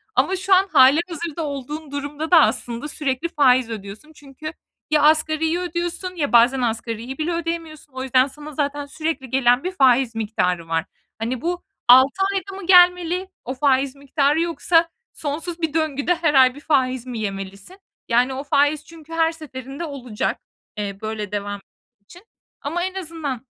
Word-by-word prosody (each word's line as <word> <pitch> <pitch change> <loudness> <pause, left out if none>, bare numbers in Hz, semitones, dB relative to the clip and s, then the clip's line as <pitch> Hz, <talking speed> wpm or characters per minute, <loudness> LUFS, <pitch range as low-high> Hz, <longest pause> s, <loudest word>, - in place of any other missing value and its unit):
Ama 380 - +2
şu 380 +1 +1
an 380 +1 +5
hâlihazırda 320 +4 +3
olduğun 290 +2 -6
durumda 285 +3 -5
da 335 -3 +8
aslında 240 -1 0
sürekli 280 0 -2
faiz 255 -6 +3
ödüyorsun. 215 +7 -8
Çünkü 290 +3 -9 0.4
ya 305 -1 +4
asgariyi 315 +2 +3
ödüyorsun 355 +1 -4
ya 295 -5 -2
bazen 240 +3 +5
asgariyi 230 +2 -3
bile 315 +2 -2
ödeyemiyorsun. 330 -3 -5
O 260 0 -5
yüzden 260 0 +3
sana 295 +2 -10
zaten 290 0 -2
sürekli 310 -2 -4
gelen 245 0 +3
bir 365 - -2
faiz 260 -7 +3
miktarı 180 -6 -1
var. 165 0 -1 0.3
Hani 235 +2 -3
bu 350 +2 -3 0.2
6 260 +9 +6
ayda 390 0 -4
mı 345 - -9
gelmeli 360 0 +5 0.2
o 255 - -3
faiz 270 0 +1
miktarı 280 +2 +1
yoksa 335 0 +2 0.2
sonsuz 325 +4 -5
bir 320 -3 -1
döngüde 315 +1 0
her 325 -3 +1
ay 260 -2 +5
bir - - -10
faiz 260 -5 0
mi 245 -3 -5
yemelisin? 195 - -6 0.3
Yani, 250 +3 +2
o 265 +1 -5
faiz 290 +1 +1
çünkü 330 -1 -13
her 325 0 +2
seferinde 280 -1 -8
olacak, 255 -8 -4 0.4
eee, 200 -2 -4
böyle 215 -2 -4
devam 205 -1 -4 0.4
için 350 - -16 0.4
ama 330 +5 -2
en 375 +1 -3
azından 315 -9 -5
285 Hz, 160 wpm, -21 LUFS, 255-330 Hz, 0.4 s, da